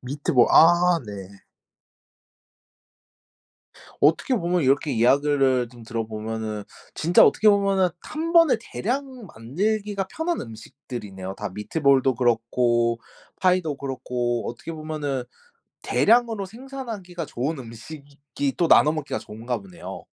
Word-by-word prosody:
미트볼. 130 -1 +1
아 175 +1 +6
네. 100 -1 -10 2.6
어떻게 160 - +3
보면 175 -5 0
이렇게 140 +3 +2
이야기를 130 0 +2
좀 120 -1 -14
들어 115 -1 -4
보면은 110 -1 -5 0.3
진짜 170 +3 +4
어떻게 215 - +4
보면은 195 -2 +2
1 325 +2 -4
번에 330 -7 +6
대량 255 +1 -4
만들기가 200 - -2
편한 320 - -2
음식들이네요, 110 -4 -8
다. - - -5
미트볼도 135 +4 +2
그렇고 120 0 +1 0.4
파이도 180 -5 +1
그렇고 125 -3 -3
어떻게 120 +7 -7
보면은 155 -5 -4 0.6
대량으로 230 -3 +2
생산하기가 220 -7 -7
좋은 140 +4 -3
음식이 140 +3 -6
또 170 - +2
나눠 150 - +6
먹기가 155 -3 -4
좋은가 115 +3 -5
보네요. 95 -3 -10
140 Hz, 275 characters per minute, -24 LUFS, 120-185 Hz, 2.6 s, 아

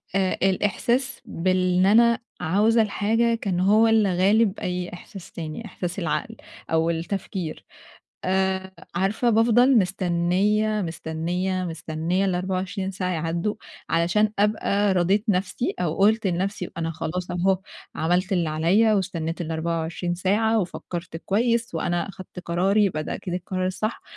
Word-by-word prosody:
آآ، 190 -1 +1
الإحساس 235 +7 0
بال 185 +1 0
إن 185 - +5
أنا 230 +3 +5 0.2
عاوزة 215 +7 +3
الحاجة، 225 +3 +1
كان 195 -5 -2
هو 210 +5 +5
اللي 210 -5 +3
غالب 205 +2 +3
أي 180 0 -3
إحساس 190 +1 -11
تاني، 160 +6 -6
إحساس 180 -2 -5
العقل 185 +6 -2 0.4
أو 160 0 +2
التفكير. 170 0 -4 0.6
آآ، 190 0 0 0.2
عارفة، 195 +7 +1
بافضل 235 +3 +5
مستنية، 190 +3 +1
مستنية، 175 +3 -2
مستنية، 165 +2 -2
ال24 190 +1 -2
ساعة 185 -1 -3
يعدّوا، 170 +4 -1 0.4
علشان 175 +6 +2
أبقى 205 -1 +2
رَضيت 190 +4 +2
نفسي، 200 +5 0
أو 165 -3 0
قُلت 215 +2 +3
لنفسي، 185 +1 -2
أنا 165 -1 -2
خلاص 175 +3 -4
أهو 185 +2 +1 0.4
عملت 180 +5 0
اللي 175 -4 +1
عليّا، 185 +8 +3
واستنيت 170 -4 -2
ال24 165 +1 -2
ساعة، 210 +5 +2
وفكرت 175 -2 -5
كويس، 230 +4 0
وأنا 175 +3 -1
أخدت 185 -1 -10
قراري، 190 +5 +2
يبقى 160 -6 -1
ده - - -4
أكيد 180 - -5
القرار 185 +1 -2
الصح. 215 +4 -3
185 Hz, 130 wpm, -24 LUFS, 175-210 Hz, 0.6 s, إن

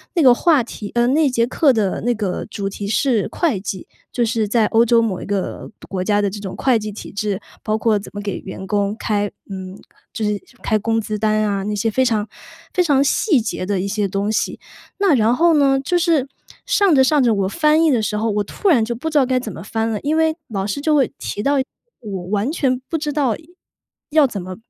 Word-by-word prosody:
那 335 - +3
个 255 -3 +7
话 305 0 +3
题 210 -3 -8
呃， 240 0 +2
那 295 +3 +3
节 235 -2 +1
课 275 +2 +3
的 205 -4 0
那 245 +1 +1
个 205 -5 -3
主 200 -2 -4
题 200 0 -6
是 225 -1 +1
会 295 - 0
计。 190 -1 -6 0.3
就 240 - +1
是 225 -1 0
在 215 0 +2
欧 230 +1 +4
洲 230 0 +4
某 205 -5 -1
一 - - -7
个 200 -2 -3
独 - - -14
国 185 -2 -3
家 205 +1 +2
的 200 - +1
这 205 +2 -7
种 195 -2 -6
会 255 -4 +2
计 215 -1 -5
体 210 - -9
制， 205 0 -2 0.2
包 215 - 0
括 220 -2 +2
怎 200 - -8
么 205 - -5
给 200 -2 -3
员 190 0 -8
工 205 +1 0
开 210 -3 -1 0.2
嗯， 190 -1 -7 0.4
就 220 - -4
是 210 -1 0 0.2
开 215 - +1
工 225 +1 0
资 215 0 -4
单 215 0 +1
啊， 200 -2 -1
那 210 +1 -2
些 215 +2 0
非 260 +4 +1
常 215 -3 0 0.4
非 360 - +2
常 280 -4 +3
细 285 - +2
节 215 -4 -3
的 195 -1 -1
一 195 - -2
些 205 0 -1
东 200 +3 -1
西。 - - -1 0.4
那 385 -8 +4
然 230 +1 +3
后 335 +1 +4
呢， 275 -2 +3
就 350 +6 0
是 325 -6 +2 0.4
上 405 -8 +3
着 265 - +6
上 290 0 +3
着， 230 -2 +3
我 195 -2 0
翻 305 - +3
译 320 - +4
的 240 -5 +2
时 210 0 -1
候， 220 +1 0
我 205 0 0
突 395 - -1
然 240 -10 +4
就 235 - -2
不 320 +7 -4
知 310 - 0
道 270 - +5
该 255 0 +1
怎 225 -4 -6
么 170 - -9
翻 225 +1 -2
了。 215 -2 -2
因 305 +2 0
为 320 0 +2
老 195 -2 -2
师 210 - -3
就 300 +1 +2
会 270 -4 +2
提 205 - -4
到 280 +5 +2 0.5
我 195 -5 -5
完 210 +7 0
全 255 -6 0
不 335 - -4
知 300 -1 -2
道 275 -7 +1 0.8
要 305 -3 +5
怎 210 -5 -5
么 185 +1 -7
225 Hz, 260 characters per minute, -20 LUFS, 205-275 Hz, 0.8 s, 个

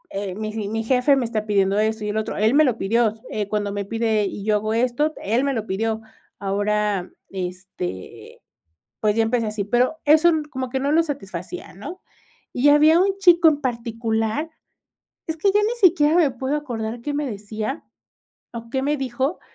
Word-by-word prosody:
eh, 195 -2 -3
mi 215 +1 -4
j 210 -2 -3
mi 225 +1 -2
jefe 255 +4 +3
me 260 - 0
está 220 -2 -2
pidiendo 200 -1 +2
esto 220 0 0
y - - -2
el 210 - -2
otro, 220 - -3
él 215 +4 +3
me 310 - +6
lo 240 -3 +1
pidió, 220 +2 +1 0.2
eh, 210 -2 -2
cuando 205 -1 -1
me 200 0 -2
pide, 220 0 0
y 195 +1 -5
yo 215 -1 +2
hago 215 +1 -2
esto, 255 +6 +1
él 230 +6 +1
me 280 -1 0
lo 220 -3 -3
pidió". 220 +3 -1 0.4
Ahora, 205 -1 -1 0.2
este, 180 - -7 0.6
pues, 210 -1 +2
ya 225 - +3
empecé 230 0 0
así. 210 -1 -2
Pero 250 +7 +1
eso 315 +3 +6 0.2
como 260 -1 -4
que 265 - -2
no 280 +2 0
lo 330 +1 +4
satisfacía, 270 - -6
¿no? 370 +2 -9 0.5
Y 270 +4 +4
había 305 +3 +6
un 390 +1 +2
chico 345 -4 +6
en 290 -1 -2
particular 230 +2 -2 0.8
es 320 - -2
que 390 +5 +2
ya 415 - +4
ni 450 +3 +1
siquiera 310 -3 +2
me 320 -6 +4
puedo 260 +3 -3
acordar 235 -5 -4
qué 290 +5 -4
me 295 0 -1
decía 215 +6 -5 0.7
o 230 0 -8
qué 265 +2 -1
me 295 +2 +1
dijo, 265 +5 -2
230 Hz, 195 wpm, -22 LUFS, 210-285 Hz, 0.8 s, me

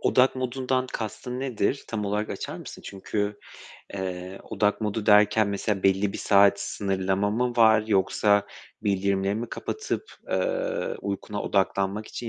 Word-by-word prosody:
Odak 130 +1 +3
modundan 130 0 -1
kastın 125 +3 -4
nedir? 130 0 -1
Tam 110 -2 -2
olarak 105 +1 -1
açar - - -5
mısın? - - -10
Çünkü, 100 +1 -3 0.6
eee, 95 0 -5
odak 105 +2 0
modu 105 0 -2
derken 105 0 +5
mesela 100 0 -1
belli 95 +1 +2
bir - - -5
saat 100 0 +5
sınırlama 95 0 -1
mı 120 +3 0
var 110 -2 +6
yoksa 100 0 +2 0.4
bildirimleri 100 -1 +1
mi 115 +3 -4
kapatıp, 435 +3 -3 0.3
eee, - - -1
uykuna 100 +1 -4
odaklanmak 100 +1 0
için 120 - -6
105 Hz, 135 wpm, -26 LUFS, 100-115 Hz, 0.6 s, var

